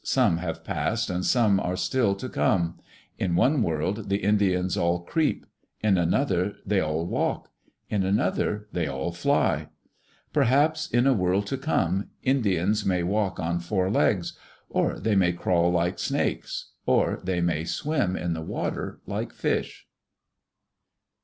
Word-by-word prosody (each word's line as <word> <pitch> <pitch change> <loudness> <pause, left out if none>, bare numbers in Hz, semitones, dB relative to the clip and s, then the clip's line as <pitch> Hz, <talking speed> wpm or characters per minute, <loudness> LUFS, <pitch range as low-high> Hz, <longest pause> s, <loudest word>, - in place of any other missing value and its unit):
Some 85 - +2
have 85 -2 -4
passed 115 -2 -1
and 90 0 -2
some 110 -5 +3
are 90 -1 -2
still 115 -5 +1
to 115 +6 -6
come. 85 -8 0 0.4
In 90 -3 0
one 130 - +3
world 95 +4 -1
the 100 - +2
Indians 95 -3 +2
all 85 -2 +1
creep; 155 - 0 0.4
in 105 -3 +4
another 90 +2 +1
they 100 0 +2
all 80 0 -1
walk; - - -2 0.4
in 105 - 0
another 105 +2 0
they 85 -3 -1
all 65 +4 -3
fly. 85 0 +1 0.7
Perhaps 150 +6 +2
in 120 +2 +2
a 135 - +5
world 95 -1 +1
to 135 +7 -3
come, 95 - 0
Indians 105 -6 +1
may 90 -3 +1
walk 100 +1 0
on 85 0 -1
four 95 +2 -1
legs; 95 -4 +1 0.4
or - - 0
they 110 -2 +1
may 90 -2 +3
crawl 85 0 +2
like 90 +1 0
snakes; - - -2 0.2
or - - +2
they 90 -1 -1
may 85 -2 0
swim 130 - -1
in 85 -2 -2
the 80 - -4
water 80 - -4
like - - -4
fish. - - -2
95 Hz, 150 wpm, -26 LUFS, 85-105 Hz, 0.7 s, a